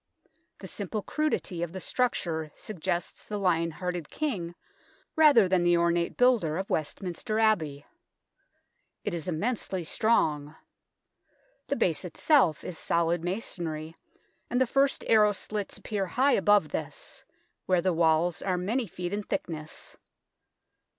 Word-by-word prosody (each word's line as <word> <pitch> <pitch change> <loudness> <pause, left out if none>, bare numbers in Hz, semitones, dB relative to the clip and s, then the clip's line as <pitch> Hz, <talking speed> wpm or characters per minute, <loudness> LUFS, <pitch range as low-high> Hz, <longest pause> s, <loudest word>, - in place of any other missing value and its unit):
The - - -7
simple 205 +1 -4
crudity 305 - -1
of 170 0 -3
the 190 - -5
structure 170 - -1
suggests 175 -3 -4
the 210 - -3
Lion 170 -4 +1
hearted 175 -1 -4
King 190 - -3 0.6
rather 290 -10 +6
than 180 -1 +2
the 175 0 +4
ornate 170 0 +1
builder 230 -11 +3
of 190 +1 -4
Westminster 180 +6 -2
Abbey. 160 -11 +1 1.2
It - - -2
is 170 -1 -5
immensely 190 +1 -2
strong. 155 -7 +1 1.1
The - - 0
base - - +1
itself 260 - +2
is 175 - -6
solid 170 0 +1
masonry, 165 -4 -4 0.5
and 245 - +1
the 260 - +4
first 275 +3 +1
arrow 210 -2 +5
slits 205 0 -4
appear 200 -3 -3
high 265 +9 +2
above 205 +1 +4
this, - - -6 0.4
where 180 -2 +2
the 185 - +2
walls 165 +1 +2
are 185 -2 0
many 220 +7 -1
feet 175 +1 -5
in 205 - -1
thickness. 155 -5 -5
180 Hz, 130 wpm, -28 LUFS, 170-215 Hz, 1.2 s, rather